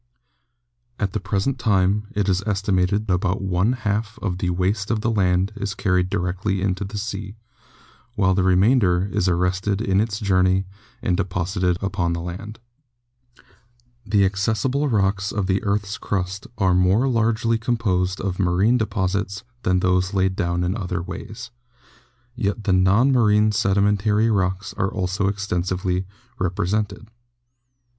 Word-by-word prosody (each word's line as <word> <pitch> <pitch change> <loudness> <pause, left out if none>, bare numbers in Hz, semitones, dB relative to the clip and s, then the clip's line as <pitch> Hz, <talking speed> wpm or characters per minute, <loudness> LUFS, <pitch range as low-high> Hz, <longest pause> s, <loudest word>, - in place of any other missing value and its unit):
At 100 -3 -2
the 110 - -1
present 100 +7 -1
time 100 -1 +2
it 105 -1 0
is 95 -1 +2
estimated 100 0 +1
about 95 +1 0
one 95 +4 +1
half 110 -2 -2
of 90 -3 -3
the 90 - -1
waste 95 +3 -1
of 110 -2 0
the 115 - 0
land 95 -2 +1
is 100 -3 -4
carried 90 -2 +1
directly 95 +2 -1
into 95 +1 -1
the 100 +2 -6
sea, 100 -1 -5 0.8
while 95 -3 +3
the 95 - +1
remainder 95 0 +3
is 90 - +1
arrested 90 +3 0
in 100 -3 +2
its 110 -1 -2
journey 95 -2 +2 0.4
and 90 - +1
de 100 - +2
posited 90 0 -1
upon 95 -3 -1
the 85 - -3
land. 95 +6 -7 1.5
The 100 -2 +3
accessible 110 +9 0
rocks 100 -2 +1
of 100 -2 -1
the 95 0 0
earth's 100 0 -1
crust 95 0 -3
are 95 -4 +2
more 95 +8 +3
largely 115 -1 +1
composed 95 -6 0
of 95 -1 -3
marine 100 +7 +3
deposits 100 -1 -2 0.2
than 90 -3 +1
those 90 +1 +1
laid 95 0 +1
down 85 0 -1
in 90 +3 -1
other 90 -5 -3
ways, 110 +6 -8 0.8
yet 110 -3 -2
the 100 - +1
non 95 +8 +4
marine 105 -4 +4
sedi 100 -1 +2
mentary 105 +2 +2
rocks 95 +1 -1
are 95 - +1
also 95 +1 -1
extensively 95 -2 -1 0.3
represented. 100 +3 -1
100 Hz, 145 wpm, -22 LUFS, 90-105 Hz, 1.5 s, non